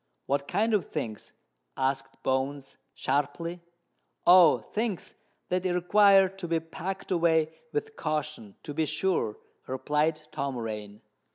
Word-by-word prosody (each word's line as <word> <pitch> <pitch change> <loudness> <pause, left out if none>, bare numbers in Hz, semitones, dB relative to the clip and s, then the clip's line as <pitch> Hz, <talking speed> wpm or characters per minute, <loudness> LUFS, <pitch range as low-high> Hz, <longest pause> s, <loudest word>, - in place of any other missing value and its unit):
"What 140 0 -1
kind 220 +5 +1
of 205 -4 +2
things?" 115 -9 -5 0.5
asked 135 +1 -2
Bones 135 +1 -1 0.2
sharply. 145 +5 -1 0.6
"Oh! 175 -3 +8
things 215 -4 -4 0.4
that 180 0 0
require 195 +2 +5
to 195 -1 -7
be 165 0 +1
packed 180 +5 -6
away 160 -3 +2 0.2
with 440 0 -3
caution, 150 -9 -3
to 145 - -6
be 160 +1 0
sure," 175 - 0 0.3
replied 150 +4 0
Tom 140 -3 -3
Rain. 105 -3 -6
160 Hz, 120 wpm, -28 LUFS, 140-185 Hz, 0.6 s, Oh